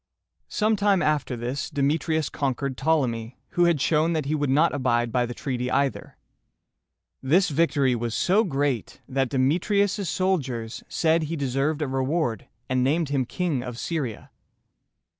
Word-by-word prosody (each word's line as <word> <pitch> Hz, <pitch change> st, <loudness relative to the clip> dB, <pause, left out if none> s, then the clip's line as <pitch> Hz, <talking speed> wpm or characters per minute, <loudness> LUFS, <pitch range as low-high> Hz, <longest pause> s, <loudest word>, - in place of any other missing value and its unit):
Some 215 Hz, 0 st, +1 dB
time 200 Hz, -3 st, +3 dB
after 150 Hz, -4 st, 0 dB
this, 125 Hz, +5 st, -3 dB
Demetrius 155 Hz, +1 st, 0 dB
conquered 140 Hz, -1 st, -2 dB
Ptolemy, 125 Hz, -7 st, 0 dB
who 175 Hz, -, +2 dB
had 170 Hz, -4 st, +3 dB
shown 160 Hz, +4 st, +2 dB
that 155 Hz, -3 st, -1 dB
he 145 Hz, -, -1 dB
would 145 Hz, -3 st, 0 dB
not 150 Hz, +5 st, +3 dB
abide 120 Hz, -4 st, +1 dB
by 125 Hz, 0 st, +1 dB
the 120 Hz, -, -6 dB
treaty 125 Hz, -2 st, -3 dB
either. 140 Hz, +1 st, -1 dB, 1.0 s
This 180 Hz, +8 st, +3 dB
victory 145 Hz, -4 st, +2 dB
was 115 Hz, -1 st, -2 dB
so 195 Hz, +4 st, +3 dB
great, 140 Hz, -, -2 dB
that 135 Hz, -1 st, 0 dB
Demetrius' 180 Hz, -, +1 dB
soldiers 135 Hz, -13 st, -1 dB
said 165 Hz, 0 st, +2 dB
he 165 Hz, +2 st, -3 dB
deserved 140 Hz, +2 st, -1 dB
a -, -, -2 dB
reward, 135 Hz, -1 st, -1 dB, 0.2 s
and 130 Hz, -1 st, +1 dB
named 150 Hz, +3 st, +1 dB
him 135 Hz, -3 st, 0 dB
King 170 Hz, -7 st, -1 dB
of 125 Hz, -2 st, -6 dB
Syria. 135 Hz, -8 st, -4 dB
140 Hz, 150 wpm, -25 LUFS, 130-165 Hz, 1.0 s, time